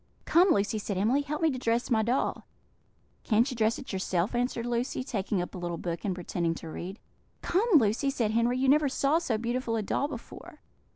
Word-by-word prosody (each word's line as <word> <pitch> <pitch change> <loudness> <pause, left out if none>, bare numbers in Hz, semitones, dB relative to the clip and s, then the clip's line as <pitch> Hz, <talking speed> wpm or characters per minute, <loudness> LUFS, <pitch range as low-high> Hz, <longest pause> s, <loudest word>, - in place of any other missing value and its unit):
"Come, 360 +3 +5
Lucy," 210 - +2
said 200 -2 -3
Emily, 230 +9 +2
"help 300 +3 -4
me 320 - +4
to 255 - -4
dress 235 +1 0
my 220 -2 +4
doll." 240 +5 -1 0.8
"Can't 230 +2 +3
you - - -5
dress 225 0 +1
it 260 - -8
yourself?" 190 +1 -1
answered 240 -1 -1
Lucy, 240 +2 -1
taking 200 -6 -2
up - - -9
a 185 - -6
little 175 -1 -3
book, 170 0 -4
and 195 -3 -1
pretending 170 -2 -2
to 165 - -8
read. 185 +5 -6 0.5
"Come, 410 +7 +1
Lucy," 240 +1 +3
said 235 -6 0
Henry, 235 +2 +2
"you 265 +1 +1
never 290 +1 +4
saw 280 +4 +2
so 255 -10 -1
beautiful 235 +1 -2
a 220 - -1
doll 280 - 0
before." 260 -6 -10
230 Hz, 210 wpm, -28 LUFS, 200-265 Hz, 0.8 s, Come